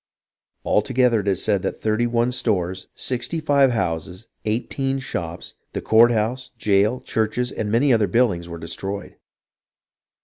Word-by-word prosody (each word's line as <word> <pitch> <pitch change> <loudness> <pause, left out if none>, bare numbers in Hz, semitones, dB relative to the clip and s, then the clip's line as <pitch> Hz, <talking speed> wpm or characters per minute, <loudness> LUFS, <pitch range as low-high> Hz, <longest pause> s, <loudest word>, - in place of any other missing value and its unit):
All - - +3
together 125 -1 +2
it 100 - -5
is 95 -2 +1
said 100 -3 +1
that - - -3
thirty 110 +2 +1
one 120 +1 +1
stores, 95 -7 -1
sixty 125 +6 -2
five 140 -3 +4
houses, 90 -3 -3 0.2
eighteen 135 +5 -1
shops, 85 -10 -5 0.2
the - - -3
court 115 +2 +6
house, 120 +3 -1
jail, 105 +4 +2
churches, 115 +3 -1
and 105 -1 -3
many 125 +4 +4
other 110 -3 +3
buildings 90 -5 +1
were 85 - -6
destroyed. 95 +4 -5
110 Hz, 145 wpm, -22 LUFS, 100-125 Hz, 0.2 s, court